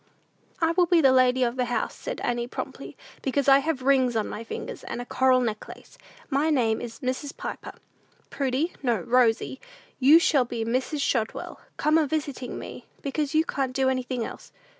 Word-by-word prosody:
"I 330 -1 +2
will 350 +1 +3
be 345 0 +4
the 270 -4 +5
lady 255 0 +4
of 240 +1 -1
the 250 - +1
house," 245 0 -2
said - - -6
Annie, 240 0 -1
promptly, - - -7 0.2
"because 275 +1 -1
I 275 0 +7
have 280 -2 -2
rings 260 -3 +3
on 220 - 0
my 225 - -6
fingers, 225 - -7
and - - -5
a 245 - -5
coral 260 0 +3
necklace. 220 -3 -5 0.3
My 290 +2 +1
name 235 -7 +1
is 235 +2 -8
Mrs. 260 +2 -3
Piper. - - -6 0.6
Prudy, 275 +5 -1
no, 240 -7 0
Rosy, 245 +4 +2 0.4
you 280 +4 +8
shall 295 -5 +3
be 235 -2 -4
Mrs. 260 +5 -1
Shotwell, 225 -5 -2 0.2
come 310 +1 +3
a 310 - +1
visiting 285 -4 -3
me; - - -9 0.2
because 290 +1 -2
you 315 +1 +4
can't 265 -6 -2
do 265 -1 +2
anything 255 -2 -2
else. - - -10
260 Hz, 185 wpm, -26 LUFS, 245-285 Hz, 0.6 s, you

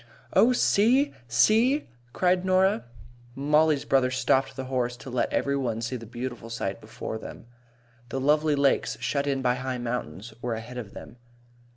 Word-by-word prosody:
"Oh, 245 - +5
see! 250 +4 +3
See!" 225 - +3 0.2
cried 180 +3 +1
Norah. 185 - +2 0.5
Mollie's 150 +1 +2
brother 135 -2 +3
stopped 130 +1 +1
the 135 - -4
horse 125 -2 -2
to 130 - -10
let 125 -1 0
every 140 0 0
one 120 -5 -1
see 115 +3 -3
the 115 -2 -8
beautiful 120 -1 -6
sight 100 -4 -4
before 110 0 -6
them. - - -10 0.6
The 135 - -3
lovely 150 +2 +2
lakes, 140 -1 +1
shut 140 0 -1
in 135 -1 -1
by 125 -1 +3
high 130 0 -3
mountains, 120 -4 -5
were 120 -2 -2
ahead 120 +3 -7
of 105 -5 -9
them. - - -11
130 Hz, 165 wpm, -26 LUFS, 120-150 Hz, 0.6 s, Oh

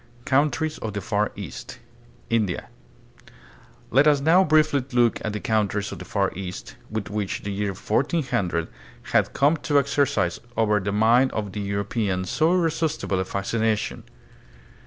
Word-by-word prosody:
Countries 150 +3 +1
of 110 -2 -4
the 100 - -2
Far 105 +1 0
East. 100 - -8 0.5
India. 110 -6 0 1.2
Let 135 +5 +5
us 145 -2 +5
now 165 +7 +5
briefly 155 -4 +3
look 120 -2 +2
at 110 - -2
the 105 - -4
countries 105 -2 0
of - - -7
the - - -8
Far 100 -3 0
East, 90 -1 -7
which 110 -1 -2
by 105 -1 -1 0.2
the 100 - -3
year 100 0 -2
1400 105 - 0 0.4
had - - +2
come 145 +4 +3
to 145 -1 +1
exercise 140 -10 +1 0.2
over 105 -2 +3
the 100 +1 -2
mind 115 +5 +4
of 105 -3 -3
the 105 - -4
European 100 -1 -1
so 155 - +2
irresistible 160 - 0
a 95 - -1
fascination. 110 +3 -1
110 Hz, 150 wpm, -24 LUFS, 100-140 Hz, 1.2 s, Let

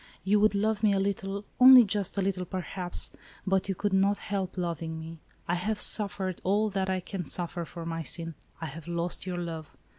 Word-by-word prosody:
You 205 +3 +3
would 210 0 +3
love 210 +1 +1
me 210 -2 +4
a 195 - +1
little, 200 0 -2
only 255 0 +10
just 205 -2 -2
a 195 - +1
little, 190 -1 -1
perhaps, 180 0 -2 0.3
but 195 0 +1
you 195 - 0
could 205 +2 -1
not 195 +1 +3
help 195 -3 -4
loving 165 -2 -3
me. 165 0 -9 0.3
I 175 - 0
*have 210 +5 -1
suffered 195 -3 +1
all 210 +3 +1
that 190 -1 -1
I 185 -1 0
can 185 0 -5
suffer 170 +2 -3
for 165 +1 -8
my 165 0 -3
sin, 165 +1 -2 0.2
— - - -29
I - - -3
have 160 +2 -8
lost 170 +2 -3
your 180 -1 -3
love. 165 -3 -6
190 Hz, 210 wpm, -28 LUFS, 170-200 Hz, 0.3 s, only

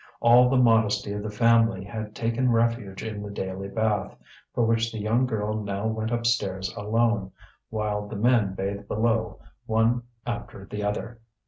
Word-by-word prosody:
All 120 +1 +6
the 130 - +3
modesty 110 -4 +3
of 105 - -3
the 105 - -4
family 115 -2 +3
had 110 +1 -6
taken 115 +2 0
refuge 115 -4 0
in 110 -2 -5
the 105 - -6
daily 95 -1 -4
bath, 105 -1 -1 0.3
for 120 - +1
which 115 0 +1
the 110 - -6
young 115 +5 +1
girl 110 -2 -2
now 100 0 -3
went 110 0 -1
upstairs 110 -6 0
alone, 110 -2 0 0.4
while 105 -2 -2
the 105 - -7
men 105 -3 +2
bathed 100 +1 -4
below 110 0 0 0.3
one 115 +2 +2 0.2
after 115 -4 -5
the 105 +1 -5
other. 110 +3 -3
110 Hz, 160 wpm, -26 LUFS, 105-115 Hz, 0.4 s, All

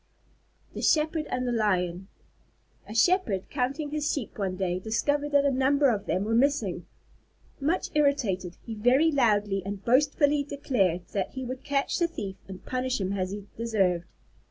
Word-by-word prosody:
_ - - -30
THE - - -5
SHEPHERD 310 0 +2
AND 250 0 -2
THE - - 0
LION 190 -5 0 0.8
A 215 - -7
Shepherd, 290 - +2
counting 280 +3 -2
his 300 0 -1
Sheep 275 -7 -4
one 190 -2 -1
day, 180 -1 -1
discovered 285 +8 -1
that 285 0 +5
a 280 - +3
number 270 +1 +3
of 205 -3 -3
them 185 - 0
were 220 +2 -1
missing. 230 - +1 0.7
Much 315 +6 0
irritated, 240 - +1
he 230 - -5
very 250 +9 +3
loudly 210 -7 +2
and 200 0 -6
boastfully 285 +3 +3
declared 200 - 0
that 195 -2 -2
he 260 -1 -4
would 255 +1 -6
catch 280 -1 0
the 340 - +3
thief 195 - -6
and 190 -1 -10
punish 255 0 -1
him 190 0 -1
as 185 -2 -1
he 200 0 -6
deserved. 195 -7 0
240 Hz, 170 wpm, -27 LUFS, 195-285 Hz, 0.8 s, that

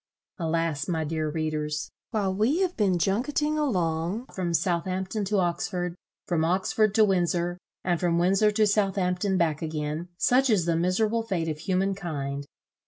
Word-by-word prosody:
Alas, 165 -3 -1
my 160 -3 0
dear 155 0 -2
readers! 150 -1 -2 0.2
while 200 -5 0
we 235 - +2
have 365 -1 0
been 195 -5 +2
junketting 280 - 0
along 185 - 0
from 180 -2 -2
Southampton 185 +4 -1
to 205 +1 0
Oxford, 175 0 -1 0.3
from 165 -3 0
Oxford 195 +4 +1
to 220 - +6
Windsor, 175 -2 0 0.2
and 175 -2 +1
from 170 -2 +1
Windsor 195 +5 +4
to 215 +1 +3
Southampton 195 -2 +1
back 160 -4 +1
again, 155 +1 -3
such 255 +6 +3
is 200 -7 +3
the 170 -1 +1
miserable 210 +7 +1
fate 190 -7 -2
of 155 -1 -3
human 190 +3 0
kind! 140 -7 -4
180 Hz, 155 wpm, -27 LUFS, 165-205 Hz, 0.3 s, to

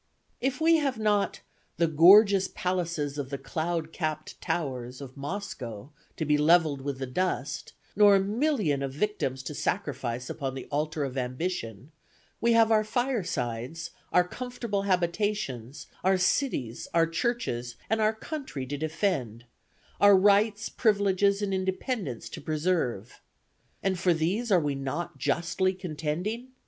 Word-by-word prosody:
"If 265 +3 -1
we 325 +1 +5
have 275 -5 0
not 210 -2 +1 0.4
'the 165 0 +2
gorgeous 190 +5 +7
palaces 170 -6 -2
of 135 -2 -4
the 140 - -3
cloud 160 +4 -3
capp'd 155 -2 -4
towers' 130 -6 -3
of 135 -2 -9
Moscow 140 - -6 0.3
to 160 - -1
be 150 0 +3
levelled 155 -2 +4
with 140 -1 -3
the 130 - -3
dust, 180 +9 -2 0.2
nor 205 -1 +7
a - - +5
million 210 - +1
of 135 -1 -3
victims 135 -7 -2
to 140 - -5
sacrifice 130 -9 -2
upon 135 -3 -4
the 130 - -6
altar 150 +1 -1
of 135 -1 -3
ambition, 130 - -4 0.5
we 235 0 +3
have 225 -1 +5
our 215 -1 +4
firesides, 165 - -2 0.2
our 180 0 +4
comfortable 240 -3 -3
habitations, 175 - -1 0.2
our 190 +1 +4
cities, 180 - 0
our 165 -1 +5
churches 165 - -2
and 220 +1 +1
our 215 0 +4
country 265 - -5
to 145 +3 -4
defend, 155 - -2 0.5
our 205 -1 +7
rights, 205 +2 +3
privileges 200 -2 +2
and 195 -1 -1
independence 190 - -2
to - - -8
preserve. 150 - -1 0.6
And 190 -2 0
for 175 -1 +3
these 195 +9 -1
are 185 - +6
we 145 -3 -1
not 145 +6 -4
justly 185 +3 0
contending? 180 - -4
170 Hz, 140 wpm, -28 LUFS, 140-205 Hz, 0.6 s, gorgeous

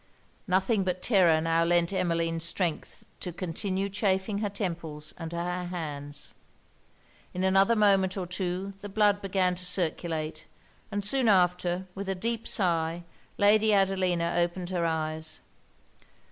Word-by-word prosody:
Nothing 190 +3 +2
but 180 -1 -2
terror 180 -8 +4
now 165 0 +2
lent 170 +1 +2
Emmeline 165 -2 0
strength 170 0 -2
to 180 - -4
continue 185 +3 -3
chafing 200 0 0
her 210 -1 -1
temples 165 -7 -4
and 165 -1 -7
her 180 +1 -3
hands. 150 -5 -5 1.0
In 180 - -1
another 195 +4 +4
moment 195 -3 +3
or 185 - -2
two 185 +2 -3
the 205 - -6
blood 205 0 +3
began 185 -2 +1
to 180 0 -6
circulate; 160 -3 -2 0.4
and 205 -1 -2
soon 255 +3 +2
after, 180 -2 +2
with 195 +1 -5
a 195 - 0
deep 230 +4 -3
sigh, 170 -2 0 0.3
Lady 215 +1 +4
Adelina 185 -3 +1
opened 175 +1 -1
her 170 -2 0
eyes. 160 -1 -3
180 Hz, 135 wpm, -28 LUFS, 170-195 Hz, 1.0 s, terror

